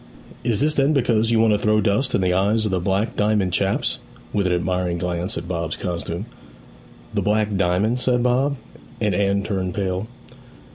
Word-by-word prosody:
'Is 115 Hz, -4 st, +1 dB
this 150 Hz, +1 st, +3 dB
then 140 Hz, +1 st, +2 dB
because 115 Hz, -5 st, +2 dB
you 115 Hz, -1 st, +3 dB
want 110 Hz, -1 st, +4 dB
to 105 Hz, -, +1 dB
throw 110 Hz, -1 st, +2 dB
dust 110 Hz, +5 st, +1 dB
in -, -, +1 dB
the 90 Hz, -1 st, +2 dB
eyes 105 Hz, +4 st, +2 dB
of 105 Hz, -, -1 dB
the 95 Hz, -, +1 dB
Black 95 Hz, +5 st, -1 dB
Diamond 105 Hz, -3 st, +1 dB
chaps?' -, -, 0 dB, 0.3 s
(with 100 Hz, -2 st, +1 dB
an 90 Hz, -, +1 dB
admiring 90 Hz, 0 st, -1 dB
glance 90 Hz, +1 st, -3 dB
at 85 Hz, +1 st, -5 dB
Bob's 85 Hz, -3 st, -3 dB
costume). 85 Hz, +1 st, -4 dB, 0.9 s
'The -, -, 0 dB
Black 105 Hz, 0 st, +1 dB
Diamond?' 100 Hz, +6 st, +1 dB
said 125 Hz, -1 st, +1 dB
Bob; 130 Hz, +3 st, +2 dB, 0.4 s
and 105 Hz, -3 st, +1 dB
Anne 100 Hz, +1 st, +1 dB
turned 95 Hz, -3 st, -2 dB
pale. 95 Hz, +1 st, -2 dB
100 Hz, 185 wpm, -22 LUFS, 90-110 Hz, 0.9 s, want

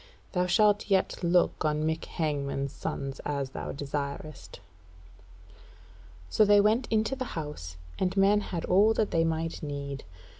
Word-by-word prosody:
Thou 180 Hz, -1 st, +1 dB
shalt 210 Hz, +2 st, +3 dB
yet 190 Hz, -1 st, +1 dB
look 175 Hz, +1 st, +2 dB
on 155 Hz, 0 st, +1 dB
Mick 160 Hz, 0 st, -1 dB
Hangman's 140 Hz, -3 st, -2 dB
sons, 135 Hz, -1 st, -5 dB
as 140 Hz, -2 st, -2 dB
thou -, -, -5 dB
desirest." 140 Hz, +1 st, -5 dB, 1.7 s
So 215 Hz, -, +3 dB
they 205 Hz, 0 st, +6 dB
went 215 Hz, +5 st, +3 dB
into 220 Hz, +4 st, +1 dB
the 260 Hz, -, -3 dB
House, 80 Hz, -, -6 dB, 0.2 s
and 185 Hz, +1 st, 0 dB
men 200 Hz, +2 st, +4 dB
had 175 Hz, -5 st, -4 dB
all 210 Hz, +5 st, +4 dB
that 215 Hz, -, 0 dB
they 165 Hz, -, +3 dB
might 165 Hz, 0 st, -2 dB
need. 140 Hz, -2 st, -5 dB
165 Hz, 145 wpm, -28 LUFS, 140-205 Hz, 1.7 s, they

